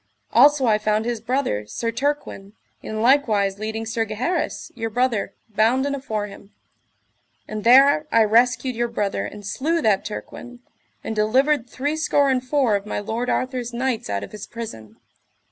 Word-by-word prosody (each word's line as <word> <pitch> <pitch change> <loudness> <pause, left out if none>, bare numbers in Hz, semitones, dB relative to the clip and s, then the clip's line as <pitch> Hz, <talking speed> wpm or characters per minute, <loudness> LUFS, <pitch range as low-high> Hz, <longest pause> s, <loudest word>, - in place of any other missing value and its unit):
Also 280 +2 +5
I 215 -2 +3
found 215 +1 0
his 235 -2 -2
brother, 235 - -1
Sir 230 - -3
Turquin, 235 -6 -3 0.3
in 220 0 -4
likewise 215 -7 +3
leading 220 +1 -4
Sir 225 0 -1
Gaheris, 230 - -3
your 225 -2 -4
brother, 240 -2 -1
bounden 245 +7 +1
afore 220 -7 -3
him; 200 0 -12 1.0
and 215 -1 -5
there 275 +5 +6
I 230 - +5
rescued 240 +3 +2
your 240 +1 0
brother 210 -4 -2
and 205 -1 -10
slew 320 +11 -1
that 205 -3 +2
Turquin, 245 +3 -8 0.4
and 225 - -4
delivered 250 +4 +2
three 290 +4 -2
score 285 -3 +2
and 255 -1 0
four 255 -5 +2
of 200 +1 -3
my - - -2
lord 225 +4 -3
Arthur's 255 -2 -2
knights 245 - -2
out 100 0 -2
of - - -9
his 210 -1 -8
prison. 110 - -8
230 Hz, 160 wpm, -22 LUFS, 210-260 Hz, 1.0 s, there